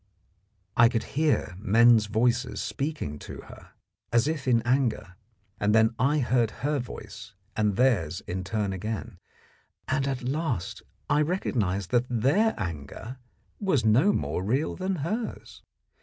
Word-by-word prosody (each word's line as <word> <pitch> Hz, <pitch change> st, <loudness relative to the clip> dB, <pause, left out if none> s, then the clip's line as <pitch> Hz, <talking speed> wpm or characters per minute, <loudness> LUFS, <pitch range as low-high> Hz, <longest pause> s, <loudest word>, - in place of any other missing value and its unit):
_ -, -, -40 dB, 0.7 s
I 115 Hz, 0 st, +6 dB
could 115 Hz, -2 st, -1 dB
hear 145 Hz, -, +1 dB
men's 115 Hz, +1 st, +5 dB
voices 120 Hz, +4 st, +1 dB
speaking 140 Hz, -, -3 dB
to -, -, -9 dB
her -, -, -14 dB, 0.4 s
as 120 Hz, +3 st, +3 dB
if 155 Hz, -4 st, -2 dB
in 115 Hz, -2 st, +3 dB
anger, 120 Hz, -6 st, 0 dB, 0.4 s
and 105 Hz, +1 st, +2 dB
then 110 Hz, +1 st, +4 dB
I 140 Hz, +4 st, +3 dB
heard 120 Hz, -4 st, +2 dB, 0.2 s
her 145 Hz, -1 st, +1 dB
voice 105 Hz, -3 st, -9 dB, 0.2 s
and 105 Hz, -2 st, +1 dB
theirs 95 Hz, -10 st, +2 dB
in 95 Hz, +1 st, -4 dB
turn 100 Hz, 0 st, -2 dB
again, 105 Hz, 0 st, -5 dB, 0.7 s
and 135 Hz, -1 st, 0 dB
at 135 Hz, -2 st, -2 dB
last 135 Hz, -, -2 dB, 0.3 s
I 150 Hz, 0 st, +3 dB
recognised 105 Hz, -, -1 dB
that 125 Hz, 0 st, +2 dB
their 140 Hz, -, +2 dB
anger 95 Hz, -, -6 dB, 0.4 s
was 185 Hz, -, +1 dB
no 125 Hz, -, +5 dB
more 95 Hz, -, -2 dB
real 130 Hz, +10 st, 0 dB
than 190 Hz, +1 st, -2 dB
hers. 220 Hz, +6 st, -4 dB
120 Hz, 140 wpm, -27 LUFS, 105-140 Hz, 0.7 s, I